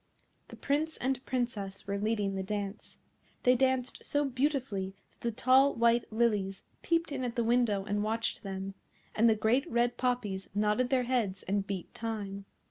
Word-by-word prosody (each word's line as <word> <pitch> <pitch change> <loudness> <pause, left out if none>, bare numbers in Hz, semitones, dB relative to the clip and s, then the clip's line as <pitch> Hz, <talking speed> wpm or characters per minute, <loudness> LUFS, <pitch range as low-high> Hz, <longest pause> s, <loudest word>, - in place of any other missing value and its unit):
The - - -10
Prince 305 +3 -1
and 260 0 -1
Princess 220 -6 -2
were 200 0 -2
leading 210 -2 0
the 190 - -2
dance. 205 +1 -5 0.5
They 250 0 +5
danced 260 0 +1
so 290 0 +1
beautifully 255 -8 -1 0.2
that - - -30
the 235 - 0
tall 260 +4 +4
white 235 0 +3
lilies 210 -4 +1 0.2
peeped 335 -2 +1
in 265 -2 -2
at 240 -2 -3
the 235 - +1
window 225 -4 +2
and 205 0 0
watched 225 +2 -1
them, 195 0 -5 0.4
and 230 +2 +4
the 220 - +4
great 240 +9 +2
red 240 +1 +1
poppies 225 -7 -1
nodded 210 +4 +2
their 260 -2 +3
heads 230 -7 -1
and 200 +1 -1
beat 190 -3 -5
time. 205 -3 -4
230 Hz, 170 wpm, -31 LUFS, 200-255 Hz, 0.5 s, They